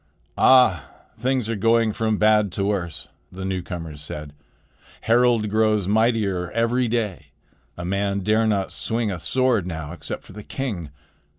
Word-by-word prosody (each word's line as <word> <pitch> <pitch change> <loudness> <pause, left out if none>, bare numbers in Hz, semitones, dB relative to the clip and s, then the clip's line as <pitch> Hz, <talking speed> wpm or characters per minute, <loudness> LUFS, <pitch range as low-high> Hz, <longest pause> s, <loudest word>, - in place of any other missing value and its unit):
"Ah! 125 - +5 0.3
things 125 -1 -1
are 115 - -1
going 115 +1 +3
from 110 -1 0
bad 105 -2 +3
to 100 - -1
worse," 85 -7 -3 0.2
the 95 +1 -6
newcomers 85 -5 -5
said. 75 0 -3 0.7
"Harald 120 -1 +3
grows 110 -3 +2
mightier 105 -4 +1
every 120 +2 +1
day. 110 -6 -2 0.5
A 85 - -5
man 100 +1 -1
dare 110 +3 +2
not 100 -3 0
swing 115 -2 -2
a 90 - -4
sword 120 +2 +1
now 80 -4 -5
except 85 - -6
for - - -14
the 105 - -8
king. 105 - -5
105 Hz, 150 wpm, -23 LUFS, 90-115 Hz, 0.7 s, Ah